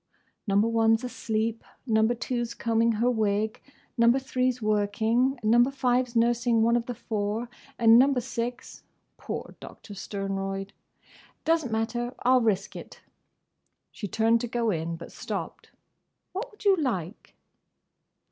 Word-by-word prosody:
"Number 200 Hz, +2 st, +3 dB
One 225 Hz, -1 st, +3 dB
's 235 Hz, -, -15 dB
asleep; 225 Hz, -2 st, -2 dB, 0.2 s
Number 220 Hz, 0 st, +2 dB
Two 245 Hz, 0 st, -2 dB
's 235 Hz, -, -6 dB
combing 230 Hz, 0 st, +1 dB
her 235 Hz, +3 st, +2 dB
wig; 215 Hz, -1 st, 0 dB, 0.4 s
Number 235 Hz, +2 st, +5 dB
Three 255 Hz, -1 st, 0 dB
's 250 Hz, -, -10 dB
working; 220 Hz, +5 st, +1 dB
Number 240 Hz, +4 st, +4 dB
Five's 250 Hz, -2 st, 0 dB
nursing 235 Hz, 0 st, +3 dB
one 235 Hz, +1 st, +3 dB
of 235 Hz, -1 st, -1 dB
the 245 Hz, -, -4 dB
four; 215 Hz, 0 st, -3 dB, 0.3 s
and 230 Hz, 0 st, +7 dB
Number 270 Hz, 0 st, +4 dB
Six"—poor 245 Hz, -1 st, -7 dB
Doctor 205 Hz, -, -11 dB
Sternroyd!—"doesn't 195 Hz, -, -4 dB
matter. 240 Hz, +3 st, -2 dB
I 250 Hz, +1 st, +4 dB
'll 255 Hz, -, +5 dB
risk 205 Hz, -4 st, 0 dB
it." -, -, -10 dB, 0.9 s
She 210 Hz, -, -6 dB
turned 225 Hz, +3 st, +2 dB
to 240 Hz, -, -3 dB
go 235 Hz, -1 st, 0 dB
in, 165 Hz, -1 st, -2 dB
but 165 Hz, -, -10 dB
stopped. -, -, -6 dB, 0.6 s
"What 405 Hz, +7 st, -4 dB
would 420 Hz, -2 st, -16 dB
you 395 Hz, -1 st, +6 dB
like?" 215 Hz, -, -3 dB
230 Hz, 140 wpm, -27 LUFS, 215-245 Hz, 0.9 s, and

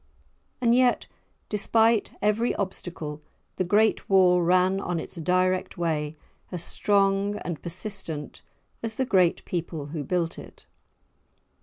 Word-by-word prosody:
And 235 Hz, -1 st, +4 dB
yet, 250 Hz, 0 st, +3 dB, 0.4 s
despite 220 Hz, +2 st, +2 dB
every 210 Hz, +3 st, +2 dB
obstacle, 165 Hz, -6 st, -4 dB, 0.4 s
the -, -, +1 dB
great 210 Hz, +5 st, +2 dB
wall 180 Hz, -2 st, +5 dB
ran 185 Hz, +2 st, +3 dB
on 175 Hz, -3 st, -2 dB
its -, -, -6 dB
direct 185 Hz, +3 st, 0 dB
way, 155 Hz, -3 st, -1 dB, 0.3 s
as 175 Hz, -2 st, -3 dB
strong 200 Hz, +1 st, +1 dB
and 170 Hz, -4 st, -4 dB
persistent 170 Hz, -4 st, -5 dB, 0.4 s
as 225 Hz, -1 st, -3 dB
the 260 Hz, -, 0 dB
great 185 Hz, -7 st, +2 dB
people 165 Hz, -4 st, -4 dB
who 155 Hz, -3 st, -3 dB
built 170 Hz, +3 st, -1 dB
it. -, -, -13 dB
185 Hz, 125 wpm, -26 LUFS, 170-205 Hz, 0.4 s, wall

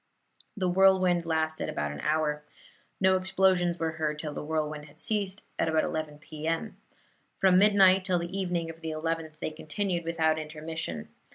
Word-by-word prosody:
The 185 Hz, -2 st, 0 dB
whirlwind 185 Hz, -2 st, +4 dB
lasted 160 Hz, -1 st, -1 dB
about 75 Hz, 0 st, -2 dB
an 75 Hz, -, -7 dB
hour. 150 Hz, -1 st, 0 dB, 0.6 s
No 190 Hz, 0 st, +4 dB
explosions 185 Hz, -2 st, +2 dB
were 165 Hz, -1 st, -1 dB
heard 155 Hz, -2 st, -2 dB
till 150 Hz, -1 st, -5 dB
the -, -, -5 dB
whirlwind 150 Hz, -1 st, -2 dB
had 150 Hz, +1 st, -13 dB
ceased, 205 Hz, -1 st, -1 dB, 0.2 s
at -, -, +2 dB
about 160 Hz, 0 st, +2 dB
11 155 Hz, -2 st, -3 dB
P.M. 160 Hz, +6 st, -4 dB, 0.6 s
From 185 Hz, -1 st, +5 dB
midnight 195 Hz, -2 st, +6 dB
till 185 Hz, -1 st, +1 dB
the 175 Hz, +2 st, -4 dB
evening 175 Hz, -4 st, -1 dB
of 165 Hz, 0 st, -16 dB
the 160 Hz, -, -4 dB
11th, 160 Hz, 0 st, -3 dB
they 160 Hz, -, -3 dB
continued 170 Hz, +3 st, -2 dB
without 160 Hz, -1 st, +1 dB
intermission. 155 Hz, -, -5 dB
165 Hz, 165 wpm, -28 LUFS, 155-185 Hz, 0.6 s, midnight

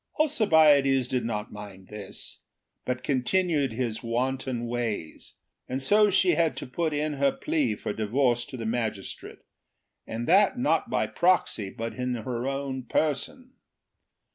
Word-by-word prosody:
Alcibiades 155 Hz, -, +4 dB
did 125 Hz, -2 st, -1 dB
not 105 Hz, -2 st, -3 dB
mind 100 Hz, -2 st, -10 dB
this, 105 Hz, -1 st, -7 dB, 0.5 s
but 125 Hz, 0 st, -2 dB
continued 145 Hz, 0 st, +1 dB
his 115 Hz, -2 st, -2 dB
wanton 125 Hz, +1 st, -2 dB
ways, 115 Hz, -9 st, -4 dB, 0.3 s
and 130 Hz, -, -2 dB
so 210 Hz, +9 st, +4 dB
she 190 Hz, -2 st, +4 dB
had 165 Hz, -1 st, +1 dB
to -, -, -5 dB
put 160 Hz, +5 st, -2 dB
in 150 Hz, +1 st, -1 dB
her 140 Hz, -1 st, +2 dB
plea 305 Hz, -3 st, -1 dB
for -, -, -4 dB
divorce 120 Hz, +2 st, +1 dB
to 130 Hz, -, -9 dB
the 115 Hz, -, -5 dB
magistrate, 110 Hz, -3 st, -4 dB, 0.7 s
and 115 Hz, +2 st, -4 dB
that 200 Hz, +7 st, +4 dB
not 250 Hz, -, +1 dB
by -, -, +1 dB
proxy, 175 Hz, -, +1 dB
but 115 Hz, +2 st, -5 dB
in 125 Hz, -1 st, -2 dB
her 120 Hz, +2 st, -3 dB
own 135 Hz, -1 st, -3 dB
person. 155 Hz, -, -2 dB
130 Hz, 140 wpm, -27 LUFS, 115-160 Hz, 0.7 s, Alcibiades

